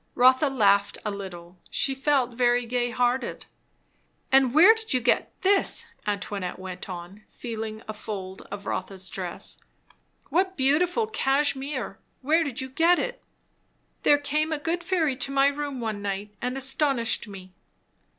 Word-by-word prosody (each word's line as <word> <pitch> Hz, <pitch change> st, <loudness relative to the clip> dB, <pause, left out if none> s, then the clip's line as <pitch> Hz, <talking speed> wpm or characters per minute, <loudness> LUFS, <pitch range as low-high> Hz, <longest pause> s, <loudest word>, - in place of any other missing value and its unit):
Rotha 260 Hz, +3 st, +5 dB
laughed 200 Hz, -6 st, +3 dB
a 210 Hz, -, 0 dB
little. 180 Hz, -3 st, -8 dB
She 270 Hz, -, +1 dB
felt 270 Hz, -2 st, +1 dB
very 245 Hz, 0 st, +2 dB
gay 245 Hz, +1 st, 0 dB
hearted. 245 Hz, 0 st, -1 dB, 0.9 s
"And 265 Hz, -2 st, +5 dB
where 340 Hz, -, +8 dB
did 445 Hz, -10 st, -2 dB
you -, -, +3 dB
get 245 Hz, 0 st, +1 dB
this?" 390 Hz, 0 st, +2 dB, 0.2 s
Antoinette 200 Hz, -2 st, -3 dB
went 185 Hz, 0 st, -8 dB
on, 180 Hz, +3 st, -8 dB
feeling 220 Hz, -2 st, -6 dB
of -, -, -20 dB
a -, -, -2 dB
fold 195 Hz, -3 st, -6 dB
of 200 Hz, 0 st, -7 dB
Rotha's 190 Hz, -1 st, -4 dB
dress. 180 Hz, -2 st, -4 dB, 0.7 s
"What 375 Hz, +5 st, +1 dB
beautiful 335 Hz, -, +2 dB
cashmere! 275 Hz, -, -1 dB, 0.2 s
Where 320 Hz, +5 st, +3 dB
did 280 Hz, -4 st, -3 dB
you 260 Hz, -, -5 dB
get 330 Hz, +6 st, +4 dB
it?" -, -, -3 dB, 0.8 s
"There 290 Hz, -, +5 dB
came 300 Hz, +2 st, -1 dB
a 315 Hz, -, 0 dB
good 335 Hz, +4 st, -2 dB
fairy 335 Hz, -6 st, +1 dB
to 275 Hz, -, -2 dB
my 275 Hz, 0 st, +4 dB
room 285 Hz, -1 st, -1 dB
one 220 Hz, -3 st, -3 dB
night, 200 Hz, +1 st, -4 dB
and 250 Hz, +2 st, -2 dB
astonished 270 Hz, -4 st, +1 dB
me." 190 Hz, -2 st, -11 dB
255 Hz, 150 wpm, -26 LUFS, 205-290 Hz, 0.9 s, where